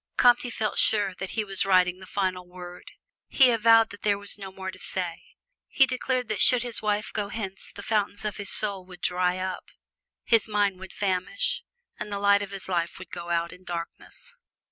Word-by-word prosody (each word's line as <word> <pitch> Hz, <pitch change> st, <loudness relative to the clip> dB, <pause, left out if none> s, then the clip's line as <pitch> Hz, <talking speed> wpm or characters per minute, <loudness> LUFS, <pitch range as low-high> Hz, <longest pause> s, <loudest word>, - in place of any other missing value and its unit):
Comte 245 Hz, 0 st, +5 dB
felt 215 Hz, -2 st, -2 dB
sure 205 Hz, -3 st, +3 dB
that 190 Hz, +1 st, -6 dB
he 220 Hz, -, +2 dB
was 195 Hz, -2 st, 0 dB
writing 185 Hz, -1 st, +3 dB
the 185 Hz, -, -12 dB
final 185 Hz, -2 st, -2 dB
word. 180 Hz, 0 st, -11 dB, 0.3 s
He 260 Hz, -3 st, +5 dB
avowed 225 Hz, 0 st, +5 dB
that 205 Hz, -, -11 dB
there 205 Hz, -1 st, +2 dB
was 205 Hz, 0 st, -3 dB
no 195 Hz, -1 st, -7 dB
more 190 Hz, 0 st, -6 dB
to -, -, -13 dB
say. 180 Hz, -3 st, -4 dB, 0.5 s
He 270 Hz, -, +4 dB
declared 255 Hz, -1 st, -1 dB
that -, -, -1 dB
should 250 Hz, -1 st, +7 dB
his 240 Hz, -2 st, -2 dB
wife 210 Hz, 0 st, -1 dB
go 205 Hz, -1 st, -2 dB
hence 195 Hz, -3 st, -4 dB
the 205 Hz, -, -10 dB
fountains 205 Hz, -1 st, -1 dB
of 210 Hz, -, -3 dB
his 200 Hz, -2 st, -1 dB
soul 200 Hz, -3 st, +2 dB
would 180 Hz, -1 st, -13 dB
dry 180 Hz, 0 st, +1 dB
up, 185 Hz, 0 st, -5 dB, 0.5 s
his 225 Hz, -2 st, +3 dB
mind 205 Hz, -3 st, 0 dB
would 190 Hz, 0 st, -9 dB
famish, 195 Hz, -, -1 dB, 0.4 s
and 210 Hz, -, -5 dB
the 200 Hz, -, -2 dB
light 200 Hz, 0 st, +4 dB
of 200 Hz, -, -5 dB
his 195 Hz, -1 st, -6 dB
life 170 Hz, -2 st, -1 dB
would 185 Hz, -2 st, -11 dB
go 175 Hz, 0 st, -7 dB
out 170 Hz, 0 st, -1 dB
in 180 Hz, 0 st, -15 dB
darkness. 175 Hz, -, -7 dB
200 Hz, 205 wpm, -26 LUFS, 185-215 Hz, 0.5 s, should